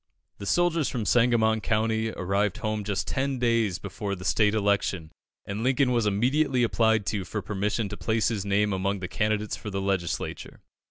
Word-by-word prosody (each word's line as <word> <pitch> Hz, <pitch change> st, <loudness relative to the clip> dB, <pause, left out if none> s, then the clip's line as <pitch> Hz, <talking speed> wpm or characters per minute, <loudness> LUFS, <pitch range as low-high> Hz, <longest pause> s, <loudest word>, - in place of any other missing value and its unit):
The 100 Hz, -, -6 dB
soldiers 170 Hz, -1 st, +2 dB
from 115 Hz, -5 st, -3 dB
Sangamon 115 Hz, -2 st, +3 dB
County 110 Hz, +1 st, 0 dB
arrived 100 Hz, 0 st, -1 dB
home 110 Hz, -1 st, -2 dB
just 100 Hz, -1 st, -2 dB
ten 135 Hz, 0 st, -1 dB
days 115 Hz, -6 st, +1 dB
before 100 Hz, +1 st, -4 dB
the 90 Hz, -1 st, -10 dB
State 105 Hz, -1 st, +3 dB
election, 100 Hz, -6 st, 0 dB, 0.3 s
and 100 Hz, +2 st, -4 dB
Lincoln 130 Hz, 0 st, +2 dB
was 120 Hz, -3 st, +2 dB
immediately 125 Hz, +5 st, +2 dB
applied 110 Hz, -2 st, +2 dB
to 100 Hz, 0 st, -2 dB
for 105 Hz, +2 st, -5 dB
permission 105 Hz, +2 st, -1 dB
to 105 Hz, -, -6 dB
place 110 Hz, -1 st, +1 dB
his 105 Hz, -4 st, -2 dB
name 100 Hz, +1 st, +1 dB
among 95 Hz, +1 st, -1 dB
the 90 Hz, -, -3 dB
candidates 105 Hz, +2 st, -1 dB
for 105 Hz, -, -7 dB
the 95 Hz, -1 st, -3 dB
Legislature. 95 Hz, -3 st, -3 dB
105 Hz, 175 wpm, -26 LUFS, 100-115 Hz, 0.3 s, Sangamon